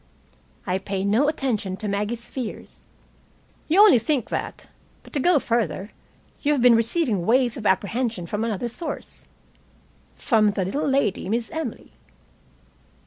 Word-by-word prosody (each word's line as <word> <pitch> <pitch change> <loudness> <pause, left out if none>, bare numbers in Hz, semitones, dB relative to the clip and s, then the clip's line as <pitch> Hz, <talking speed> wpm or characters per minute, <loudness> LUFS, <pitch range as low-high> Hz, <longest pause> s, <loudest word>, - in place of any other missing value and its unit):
"I 185 0 -1
pay 195 0 -3
no 225 +8 +3
attention 225 -11 -2
to 210 - -4
Maggie's 210 +4 -2
fears." 250 -4 -7 0.8
"You 350 +6 +5
only 405 - +7
think 265 0 -1
that. - - -5 0.4
But - - -17
to 295 - 0
go 350 +4 +4
further 230 -5 -1 0.5
you 295 - +2
have 275 - 0
been 245 -1 +7
receiving 230 - +1
waves 240 +3 +2
of 215 -4 -2
apprehension 210 +1 0
from 210 +5 -3
another 230 +1 -2
source 280 +8 -6 0.9
from 215 -4 +2
the 195 -3 -1
little 275 +12 -2
lady, 270 -9 0
Miss 230 +4 -1
Emily." 320 -1 -5
230 Hz, 140 wpm, -23 LUFS, 205-270 Hz, 0.9 s, only